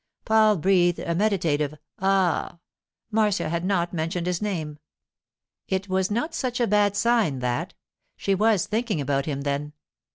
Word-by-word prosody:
Paul 215 -2 +4
breathed 175 0 +3
a 170 - -2
meditative 165 -7 0 0.2
'Ah!' 190 -3 +1 0.5
Marcia 210 -6 +1
had 170 +1 -2
not 180 -2 0
mentioned 170 +1 -2
his 180 0 -1
name. 160 -8 -3 0.9
It 190 +1 -2
was 190 0 +1
not 240 +10 -2
such 255 -6 -2
a 240 - +3
bad 205 -1 +2
sign, 220 - +2
that: 125 -1 -2 0.4
she 195 - 0
was 210 -1 +2
thinking 220 -4 -1
about 140 0 -1
him, 140 -2 -2
then. 145 +1 -3
185 Hz, 150 wpm, -25 LUFS, 160-210 Hz, 0.9 s, Paul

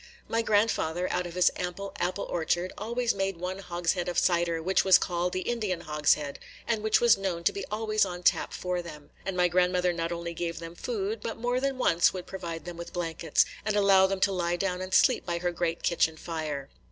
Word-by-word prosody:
My 230 - +1
grandfather, 205 -6 +1
out 180 - -1
of 170 - -9
his 180 - +4
ample 180 +2 -4
apple 185 +2 -1
orchard, 175 +2 -1
always 235 +3 -1
made 195 -2 -2
one 180 +2 -4
hogshead 175 -1 -1
of 175 - -4
cider 170 -2 +2
which 185 +4 +2
was 190 -2 +7
called 175 -1 -1
the 185 - -2
Indian 210 -5 -2
hogshead, 150 -2 +1 0.3
and 225 -2 0
which 215 0 +3
was 235 -3 +5
known 180 -3 -2
to - - +3
be 200 - -4
always 215 0 +1
on 180 -2 -4
tap - - +2
for 180 -1 -2
them; 150 -4 -11 0.2
and 190 -1 -2
my 180 0 +4
grandmother 180 0 +2
not 165 0 -2
only 170 0 -4
gave 170 0 -3
them 165 0 -7
food, 210 +2 -3
but 225 - -4
more 245 +2 0
than 270 0 -1
once 175 -8 +3
would 185 -2 -6
provide 170 -4 -6
them 175 -1 -7
with 170 - -8
blankets, 165 -3 +1 0.2
and 215 - 0
allow 195 -2 +5
them 195 0 -2
to 195 - +4
lie 175 -2 0
down 180 0 -2
and 185 0 -2
sleep - - +4
by 170 -1 -2
her 175 +1 -1
great 170 -1 -2
kitchen 160 -2 +1
fire. 155 -5 -4
180 Hz, 215 wpm, -28 LUFS, 170-195 Hz, 0.3 s, was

